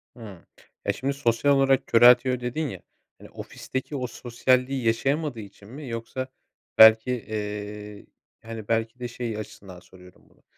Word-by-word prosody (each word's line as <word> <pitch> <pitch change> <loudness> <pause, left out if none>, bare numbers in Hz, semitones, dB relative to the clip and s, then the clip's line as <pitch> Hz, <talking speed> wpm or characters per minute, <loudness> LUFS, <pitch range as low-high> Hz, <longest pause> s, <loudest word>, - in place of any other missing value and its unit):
Hıı. 105 -7 -12 0.4
Eee, - - +1
şimdi 135 +2 -2
sosyal 140 +1 +2
olarak 135 -1 +2
köreltiyor 125 +2 +5
dedin 125 +6 -3
ya, - - -8 0.4
hani, - - -14
ofisteki 130 +2 -6
o 125 -2 -3
sosyalliği 125 +2 0
yaşayamadığı 135 +3 0
için 100 -1 -12
mi 140 +3 -9
yoksa 115 +3 -5 0.5
belki, 110 +2 +8
eee, 105 -2 -6 0.4
hani, 115 -2 -8
belki 115 +2 -1
de, 125 - -4
şey 115 -2 -5
açısından 95 -3 -10
soruyorum 90 0 -19
bunu. - - -29
115 Hz, 140 wpm, -25 LUFS, 110-130 Hz, 0.5 s, belki